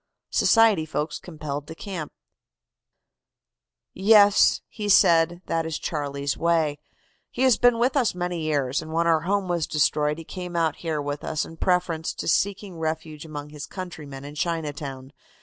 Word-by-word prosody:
SOCIETY 220 -8 +4
FOLKS 150 +1 -3
COMPELLED 150 -4 -6
TO 160 - -8
CAMP. 175 -5 -6 1.8
"'Yes,' 205 +1 +5
he 210 -2 -5
said, 170 -2 +4
'that 165 -1 -1
is 160 - -3
Charlie's 140 -2 -3
way. 160 -3 +1 0.5
He 250 - -2
has 255 -4 +4
been 245 -1 +5
with 250 +4 +1
us 250 -9 +2
many 175 -1 -3
years, 145 -4 0
and 160 - -9
when 165 +1 +1
our 165 -1 +4
home 200 -1 +1
was 170 -3 -1
destroyed 150 0 +1
he 165 - -8
came 180 +1 -7
out 165 -2 +1
here 160 -3 -3
with 145 0 -4
us 155 - -2
in 165 - -11
preference 175 -3 0
to - - -5
seeking 195 +1 0
refuge 160 -1 -4
among 150 -2 -7
his 150 -1 -8
countrymen 150 -7 -8
in 145 - -8
Chinatown. 145 -5 -4
165 Hz, 160 wpm, -25 LUFS, 150-180 Hz, 1.8 s, Yes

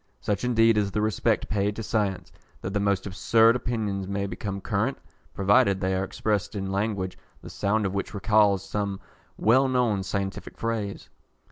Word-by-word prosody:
Such 105 +1 -2
indeed 115 -3 +4
is 100 -1 0
the 105 - -2
respect 110 +1 +1
paid 105 0 0
to 115 - -5
science, 100 -5 -1 0.3
that 95 - -4
the 100 - +1
most 100 -2 0
absurd 110 +4 +4
opinions 105 -6 -2
may 100 0 -2
become 100 0 -4
current, 110 +6 -1 0.4
provided 100 0 +3
they 95 0 0
are 95 0 0
expressed 105 +1 -2
in 95 -1 -3
language, 100 -2 -2 0.2
the - - -9
sound 105 +1 0
of 95 - -1
which 100 +2 -3
recals 100 -2 +3
some 100 -1 -2 0.4
well 130 +5 +4
known 125 -6 +1
scientific 95 0 -4
phrase. 110 -3 -3
100 Hz, 165 wpm, -26 LUFS, 100-110 Hz, 0.4 s, indeed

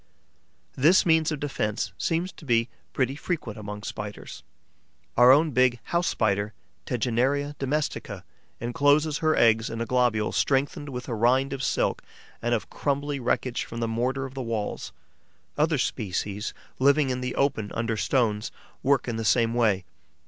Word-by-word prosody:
This 160 +8 +5
means 160 -2 +3
of 150 - -3
defence 105 -8 -2
seems 170 - -1
to - - -16
be 115 -3 +2 0.2
pretty 130 0 0
frequent 145 - -4
among 105 0 -7
Spiders. 105 -1 -7 0.7
Our 125 +1 +8
own 150 +3 +5
big 125 -1 +3
House 170 +1 0
Spider, 105 -1 0 0.3
Tegenaria 130 +5 0
domestica, 145 +2 -2 0.4
encloses 145 +5 +2
her 155 -1 +2
eggs 115 -1 +4
in 115 - -5
a 115 - -1
globule 120 -3 +1
strengthened 140 +1 0
with 125 -2 -6
a 120 - -3
rind 130 +5 +2
of 135 - -4
silk 125 - 0 0.4
and 120 0 +1
of 110 - -4
crumbly 140 0 -1
wreckage 125 0 -1
from 115 - -7
the 115 - 0
mortar 125 +4 -1
of 135 - -8
the 135 - -4
walls. 115 -4 -3 0.6
Other 150 +1 +2
species, 105 -3 -2 0.3
living 140 +1 +4
in 125 0 -2
the 125 0 -3
open 110 -7 0
under 115 0 -1
stones, 110 -2 0 0.3
work 135 -2 +2
in 115 -2 -2
the 115 - -2
same 115 +1 +3
way. 105 -6 +2
125 Hz, 155 wpm, -26 LUFS, 115-140 Hz, 0.7 s, Our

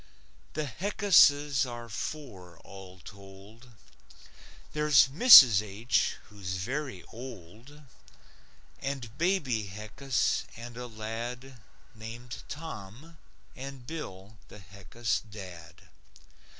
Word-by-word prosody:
The 155 0 -2
Heckuses 145 - +3
are 120 -1 -8
four 100 - -7
all 95 -1 -12
told. 100 +5 -14 1.0
There's 150 -3 +5
Mrs. 135 - +9
H. 105 +4 0
who's 95 -3 -7
very 125 +2 -4
old, 120 - -11 1.0
And 130 -5 -5
Baby 140 - 0
Heckus, 110 +6 -2
and 120 0 -9
a 125 0 -7
lad 120 +3 -7 0.3
Named 115 +2 -9
Tom, 150 +1 -9 0.4
and 135 -1 -9
Bill, 105 -9 -8
the - - -13
Heckus 100 +5 -4
dad. 90 -6 -12
120 Hz, 90 wpm, -29 LUFS, 100-140 Hz, 1.0 s, Mrs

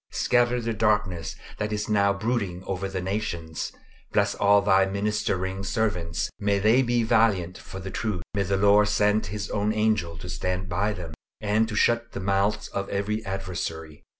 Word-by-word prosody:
Scatter 120 0 +2
the 115 -1 -2
darkness 105 -5 0 0.2
that 105 0 -2
is 105 0 -2
now 100 -2 +3
brooding 100 -3 -2
over 95 0 -3
the 95 -2 -3
nations. 90 -5 -3 0.4
Bless - - +2
all 100 0 +4
thy 95 -1 +5
ministering 100 -1 -1
servants; 90 -6 -1
may 100 0 +1
they 110 +6 +4
be 120 -2 +1
valiant 110 -6 +2
for 95 - -9
the 95 0 -6
truth; 105 -6 -2
may 100 - 0
the 100 0 0
Lord 105 +1 +5
send 105 0 +2
His 105 +2 -5
own 105 +1 +1
angel 110 -6 0
to - - -8
stand 90 0 -2
by 100 +4 0
them, 85 -5 -7 0.3
and 110 +1 +1
to 105 - -4
shut 115 +2 +2
the - - -4
mouths 100 +2 0
of 100 0 -4
every 105 +2 -1
adversary. 80 -5 -4
100 Hz, 175 wpm, -26 LUFS, 95-105 Hz, 0.4 s, thy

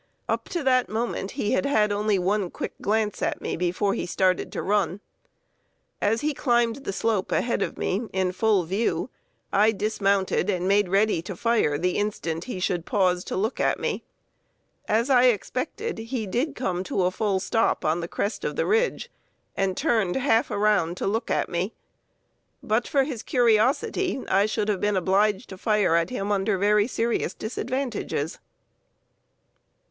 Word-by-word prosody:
Up - - -2
to 345 -4 -2
that 255 -2 +3
moment 220 -3 -2
he 205 - 0
had 270 - +1
had 215 -7 +2
only 205 0 +1
one 190 +1 0
quick - - -5
glance 210 0 0
at - - -1
me - - -3
before 180 +3 0
he - - -3
started 185 0 +1
to - - -4
run. 195 -2 0 1.0
As 225 +2 +1
he 300 0 0
climbed 240 -3 +1
the 275 - -5
slope 205 0 -1
ahead 240 - 0
of - - -2
me, 215 +5 -1
in 190 -1 0
full 205 0 +2
view, 180 -1 -1 0.4
I 210 +3 +5
dismounted 200 -2 0
and 185 -2 0
made 200 -1 +3
ready 200 -2 +2
to 185 +2 -7
fire 220 -9 +1
the 180 +3 0
instant 170 -6 -2
he 245 -7 -5
should 180 -2 -1
pause 185 -5 +2
to - - -4
look 215 +6 -1
at - - +1
me. - - -2 0.8
As 230 +5 +1
I 250 -1 +6
expected, 255 - -1
he 230 0 -3
did 255 - -1
come 185 -7 -2
to 190 - 0
a 180 - +2
fall 195 0 0
stop 225 +4 0
on 155 +2 +1
the 170 - -4
crest 200 +4 -3
of - - -2
the - - 0
ridge, 455 +3 0 0.4
and 190 -1 0
turned 220 - +1
half 250 -4 +2
around 200 -5 +1
to - - -3
look 225 +4 -1
at - - +1
me. 180 +5 -2 0.9
But 220 +3 0
for 275 -2 +3
his 265 -5 -4
curiosity 260 - +2
I 195 +2 +3
should 215 -1 -1
have 205 -3 0
been 205 -1 +1
obliged 195 +4 +1
to 190 - -9
fire 210 -5 +2
at 170 0 +2
him 205 -5 -3
under 200 0 +1
very 205 +2 +3
serious 235 -1 -1
disadvantages. 235 - -3
210 Hz, 175 wpm, -25 LUFS, 190-235 Hz, 1.0 s, I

